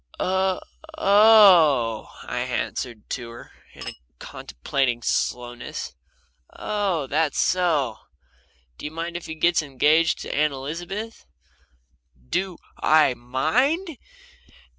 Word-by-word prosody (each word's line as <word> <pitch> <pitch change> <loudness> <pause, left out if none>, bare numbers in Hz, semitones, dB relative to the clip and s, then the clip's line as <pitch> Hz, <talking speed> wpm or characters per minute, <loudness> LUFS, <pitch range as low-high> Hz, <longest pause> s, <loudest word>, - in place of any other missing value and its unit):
"O - - 0
o 190 0 0 0.4
oh!" 190 - +5
I - - -4
answered 120 -4 -3
her, 120 -1 -10 0.2
in - - -9
a - - -5 0.2
contemplating 120 - -3
slowness. 120 +1 -3 0.6
"Oh 200 -8 -2
that's 150 +2 0
so! 155 -11 +1 0.8
Do - - -8
you 150 - -4
mind 165 +2 -5
if 175 - -6
he 160 - -6
gets 170 +2 +2
engaged 155 +3 +2
to - - -5
Aunt 150 -1 +2
Elizabeth?" 175 +11 -6 1.0
"Do 185 -2 -2 0.2
I 155 -4 +4
MIND?" 245 - -1
160 Hz, 105 wpm, -23 LUFS, 130-190 Hz, 1.0 s, oh